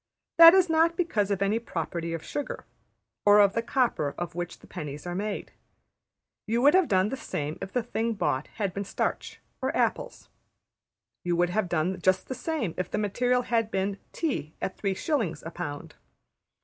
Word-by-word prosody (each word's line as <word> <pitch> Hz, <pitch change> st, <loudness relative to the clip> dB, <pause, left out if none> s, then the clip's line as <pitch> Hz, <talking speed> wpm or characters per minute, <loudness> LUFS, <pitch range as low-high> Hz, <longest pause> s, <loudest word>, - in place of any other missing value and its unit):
That 335 Hz, +2 st, +11 dB
is 375 Hz, -1 st, +5 dB
not 325 Hz, +1 st, +3 dB
because 220 Hz, -, 0 dB
of 200 Hz, -1 st, 0 dB
any 210 Hz, +3 st, +1 dB
property 170 Hz, -5 st, -4 dB
of 165 Hz, -1 st, -4 dB
sugar, 290 Hz, -, -5 dB, 0.6 s
or 205 Hz, 0 st, +7 dB
of 200 Hz, -1 st, +5 dB
the 230 Hz, -, 0 dB
copper 230 Hz, -, 0 dB
of 175 Hz, -1 st, -4 dB
which 175 Hz, 0 st, -5 dB
the -, -, -18 dB
pennies 150 Hz, -4 st, -7 dB
are 175 Hz, -, -3 dB
made. 205 Hz, +3 st, -4 dB, 1.0 s
You 230 Hz, +2 st, +1 dB
would 290 Hz, -, +7 dB
have 370 Hz, -3 st, +4 dB
done 190 Hz, +1 st, +2 dB
the 270 Hz, -, -3 dB
same 150 Hz, -, -4 dB
if 195 Hz, -, -5 dB
the 245 Hz, -, 0 dB
thing 230 Hz, 0 st, -1 dB
bought 150 Hz, -9 st, -1 dB
had 200 Hz, -5 st, -2 dB
been 200 Hz, -, -3 dB
starch 200 Hz, -, -3 dB, 0.2 s
or -, -, -1 dB
apples. -, -, -1 dB, 1.0 s
You 175 Hz, -1 st, 0 dB
would 175 Hz, +1 st, +2 dB
have 200 Hz, -1 st, 0 dB
done 175 Hz, +3 st, -1 dB
just 185 Hz, 0 st, +1 dB
the -, -, -1 dB
same 260 Hz, -, -2 dB
if 185 Hz, -, -2 dB
the -, -, -2 dB
material 245 Hz, +5 st, +1 dB
had 230 Hz, -3 st, 0 dB
been 195 Hz, 0 st, -2 dB
tea 255 Hz, -, -3 dB
at 190 Hz, -, -3 dB
3s.\ 195 Hz, -, -1 dB
a 165 Hz, -, -5 dB
pound. 145 Hz, -5 st, -6 dB
200 Hz, 185 wpm, -27 LUFS, 175-245 Hz, 1.0 s, That